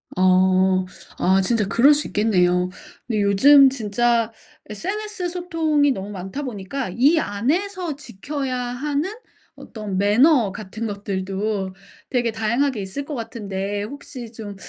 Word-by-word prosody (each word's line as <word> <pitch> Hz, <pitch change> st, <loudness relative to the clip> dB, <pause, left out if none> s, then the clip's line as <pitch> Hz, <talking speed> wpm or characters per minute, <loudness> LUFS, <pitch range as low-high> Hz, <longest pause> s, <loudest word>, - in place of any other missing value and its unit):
아. 185 Hz, 0 st, +3 dB, 0.3 s
아 190 Hz, +1 st, +3 dB
진짜 215 Hz, +2 st, +1 dB
그럴 265 Hz, +8 st, +5 dB
수 295 Hz, 0 st, -1 dB
있겠네요. 180 Hz, -4 st, +2 dB, 0.4 s
근데 215 Hz, -4 st, 0 dB
요즘 270 Hz, +8 st, +7 dB
진짜 235 Hz, -1 st, 0 dB, 0.4 s
SNS 380 Hz, -, -4 dB
소통이 325 Hz, -5 st, +1 dB
너무 200 Hz, -5 st, -4 dB
많다 195 Hz, +8 st, -6 dB
보니까 245 Hz, 0 st, -4 dB
이 285 Hz, +8 st, +4 dB
안에서 325 Hz, -, -1 dB
지켜야 270 Hz, +2 st, -5 dB
하는 280 Hz, +8 st, -2 dB, 0.4 s
어떤 210 Hz, -5 st, -6 dB
매너 225 Hz, +2 st, +4 dB
같은 220 Hz, +2 st, -6 dB
것들도 195 Hz, 0 st, -3 dB, 0.4 s
되게 240 Hz, -3 st, 0 dB
다양하게 230 Hz, +3 st, 0 dB
있을 195 Hz, +9 st, -5 dB
것 300 Hz, -, -6 dB
같은데 205 Hz, -4 st, -4 dB
혹시 245 Hz, 0 st, -8 dB
좀 215 Hz, -3 st, -8 dB
225 Hz, 255 characters per minute, -22 LUFS, 200-280 Hz, 0.4 s, 요즘